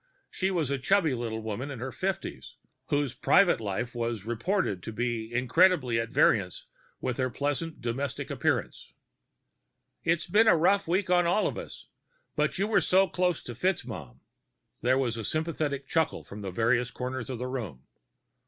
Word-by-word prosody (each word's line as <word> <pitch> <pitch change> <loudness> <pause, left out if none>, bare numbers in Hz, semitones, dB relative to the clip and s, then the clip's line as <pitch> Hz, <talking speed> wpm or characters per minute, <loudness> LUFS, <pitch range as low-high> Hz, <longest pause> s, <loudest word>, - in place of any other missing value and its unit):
She 190 - 0
was 165 -7 0
a 140 - 0
chubby 165 +1 +3
little 115 -2 -3
woman 110 +6 -4
in 140 - -6
her 130 +3 -5
fifties, 190 +5 -4 0.3
whose 145 -3 0
private 170 +3 +4
life 110 +4 -3
was 115 -4 -3
reported 120 - -1
to 110 - -6
be 115 0 -2
incredibly 125 0 +3
at 115 0 -2
variance 95 -6 +2 0.3
with 125 - -2
her 130 -1 0
pleasantly 145 +6 -2
domestic 120 +1 -3
appearance. - - -1 1.1
"It's 165 -1 +1
been 225 +2 +4
rough 195 +1 +4
on 180 -1 +3
all 195 +5 +2
of - - -1
us, - - -9 0.5
but - - 0
you 195 - +1
were 210 -3 +3
so 190 +2 +4
close 180 -1 0
to 120 - -7
Mr. - - -16 0.3
FitzMaugham...." 70 - -8 0.6
There 130 +2 +3
was 115 -5 -1
sympathetic 155 -3 -2
clucking 160 -1 0
from 100 -1 -7
various 120 +5 +2
corners 125 0 -5
of 130 - -3
the 125 - -4
room. 110 - -5
130 Hz, 160 wpm, -28 LUFS, 115-170 Hz, 1.1 s, private